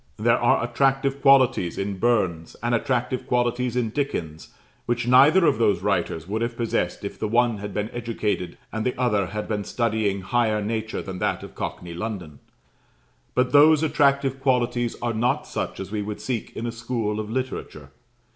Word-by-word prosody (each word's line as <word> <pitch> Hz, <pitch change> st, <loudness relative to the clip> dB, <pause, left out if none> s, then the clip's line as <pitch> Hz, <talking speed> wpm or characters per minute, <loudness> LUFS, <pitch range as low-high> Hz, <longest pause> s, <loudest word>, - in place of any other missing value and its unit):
There -, -, +3 dB
are -, -, +3 dB
attractive 135 Hz, +3 st, +1 dB
qualities 130 Hz, -11 st, +4 dB
in 100 Hz, 0 st, -3 dB
Burns, 95 Hz, -9 st, 0 dB
and 120 Hz, 0 st, 0 dB
attractive 125 Hz, +1 st, -1 dB
qualities 125 Hz, 0 st, 0 dB
in 120 Hz, -3 st, 0 dB
Dickens, 85 Hz, -, -3 dB, 0.4 s
which 120 Hz, 0 st, -1 dB
neither 140 Hz, +9 st, +6 dB
of 115 Hz, -, +2 dB
those 110 Hz, -3 st, +2 dB
writers 80 Hz, +1 st, -1 dB
would 110 Hz, +3 st, -2 dB
have 115 Hz, 0 st, -2 dB
possessed 105 Hz, -5 st, -1 dB
if 100 Hz, -, -6 dB
the 110 Hz, -, -1 dB
one 120 Hz, -1 st, +2 dB
had 105 Hz, 0 st, -6 dB
been 105 Hz, +1 st, -2 dB
educated, 110 Hz, -6 st, -3 dB
and 110 Hz, -1 st, -3 dB
the 125 Hz, +1 st, -2 dB
other 105 Hz, -7 st, +1 dB
had 105 Hz, +3 st, -5 dB
been 105 Hz, -2 st, -2 dB
studying 110 Hz, -4 st, -1 dB
higher 110 Hz, +1 st, +1 dB
nature 110 Hz, +1 st, -3 dB
than 95 Hz, -2 st, -6 dB
that -, -, -1 dB
of -, -, -10 dB
cockney 85 Hz, -1 st, -5 dB
London; 85 Hz, -7 st, -6 dB, 1.0 s
but 125 Hz, 0 st, +2 dB
those 150 Hz, +2 st, +6 dB
attractive 140 Hz, -3 st, +2 dB
qualities 125 Hz, -3 st, +1 dB
are 120 Hz, -1 st, 0 dB
not 115 Hz, +3 st, 0 dB
such -, -, -4 dB
as 95 Hz, 0 st, -6 dB
we 105 Hz, -1 st, -2 dB
should 105 Hz, 0 st, -5 dB
seek 120 Hz, -4 st, -4 dB
in 115 Hz, -, -4 dB
a 120 Hz, -, -2 dB
school 115 Hz, -2 st, -3 dB
of 105 Hz, -1 st, -4 dB
literature. 115 Hz, -, -5 dB
115 Hz, 175 wpm, -24 LUFS, 105-125 Hz, 1.0 s, neither